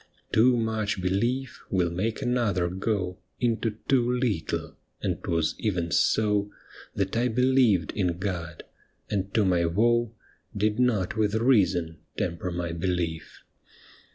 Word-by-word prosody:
Too 120 +3 +5
much 110 -2 -1
belief 115 +8 -1
will 90 -3 +1
make 110 +9 -2
another 110 -8 +1
go 95 -1 -2 0.2
Into 115 -2 0
too 125 -3 +3
little, 115 -10 -2 0.2
and - - -3
'twas 85 -2 0
even 90 -6 -1
so 105 +4 +2 0.5
That 95 +1 -1
I 120 +2 +2
believed 125 - +3
in 90 -4 -1
God, 85 -4 -4 0.5
and 100 -1 -1
to 110 -3 +4
my 90 -2 +2
woe 120 +5 +2 0.4
Did 105 +2 +1
not 110 -6 +1
with 105 -1 +1
reason 95 - +2 0.2
temper 85 +1 -2
my 85 -1 -3
belief. 85 -1 -3
100 Hz, 125 wpm, -27 LUFS, 90-115 Hz, 0.5 s, Too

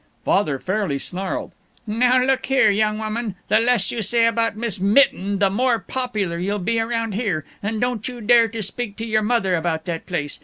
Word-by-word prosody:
Father 155 -8 +2
fairly 190 -2 -1
snarled, 185 +6 -4 0.3
"Now 250 +4 +3
look 265 0 0
here, 265 -6 +4
young 215 +1 +1
woman, 215 -1 -3
the 215 +2 +5
less 235 -3 +2
you 235 - -3
say 230 +2 +2
about 230 -1 +1
Miss 225 -5 -3
Mitten 200 -1 +3
the 195 -1 +2
more 245 +3 +2
popular 210 -7 -3
you'll 200 +4 -1
be 220 +4 0
around 230 0 -1
here. 195 -8 -2 0.2
And 215 +2 -2
don't 245 -2 -1
you 250 -1 -7
dare 230 +1 +5
to 225 0 -5
speak 210 +1 -5
to 225 - -4
your 215 -1 +1
mother 215 -4 +1
about 165 -2 -1
that 170 -2 -5
place. 150 -6 -3
215 Hz, 195 wpm, -21 LUFS, 195-235 Hz, 0.3 s, the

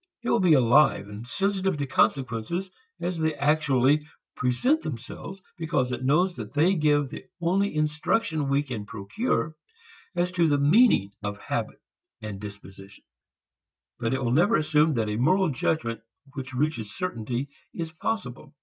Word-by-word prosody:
It - - 0
will 235 - +3
be 180 -5 +5
alive 125 -4 +4
and 105 +3 -8
sensitive 195 +2 0
to 145 - -1
consequences 135 - 0 0.3
as 175 -1 -3
they 160 -1 0
actually 145 -1 +2 0.3
present 190 - +1
themselves, 155 - -7 0.2
because 155 -6 0
it 125 - -4
knows 175 +7 +2
that 110 -1 -7
they 160 +6 +4
give 150 -4 +2
the - - -9
only 185 +2 +1
instruction 155 +1 0
we 140 +1 +2
can 115 -7 -6
procure 125 - -2 0.6
as 175 +1 0
to 175 -2 +2
the 145 -2 +3
meaning 145 - +4
of 100 -1 -4
habits - - -4 0.4
and 105 -2 -6
dispositions. 100 -1 -11 0.9
But 120 +2 0
it 135 - -2
will 120 - 0
never 175 - +4
assume 155 -2 +3
that 110 -2 0
a 105 0 -2
moral 185 +9 +3
judgment 125 -3 -1 0.3
which 135 -2 -6
reaches 130 -6 -1
certainty 125 -5 -3 0.2
is 165 -1 -5
possible. 125 +1 -4
145 Hz, 150 wpm, -26 LUFS, 120-170 Hz, 0.9 s, be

